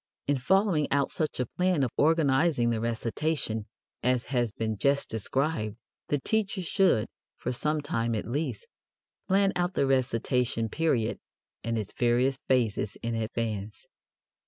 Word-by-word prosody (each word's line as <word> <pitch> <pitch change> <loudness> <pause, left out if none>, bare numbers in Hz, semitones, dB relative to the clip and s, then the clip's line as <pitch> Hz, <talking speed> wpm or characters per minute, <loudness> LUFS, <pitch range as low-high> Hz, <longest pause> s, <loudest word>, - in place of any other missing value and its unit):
In 145 -1 +1
following 190 +1 +2
out 140 -1 +2
such 155 -4 -2
a 125 - +1
plan 180 +2 +1
of 125 - 0
organizing 145 -4 +3
the 110 -1 -1
recitation 115 0 -1 0.3
as 125 -1 +1
has 120 -3 +1
been 110 0 -2
just 140 0 +2
described, 110 0 -1 0.3
the 145 - +1
teacher 195 +4 -1
should, 165 - +3 0.3
for 125 - -3
some 150 +5 0
time 115 -5 -1
at 105 - -3
least, 150 - -3 0.6
plan 195 0 +3
out 180 +1 0
the - - +3
recitation 125 -3 +1
period 135 -6 0 0.4
and 115 0 -1
its 105 -3 -4
various 125 +2 +2
phases 115 -5 +1
in 115 0 -1
advance. 110 -1 -3
130 Hz, 140 wpm, -28 LUFS, 115-155 Hz, 0.6 s, organizing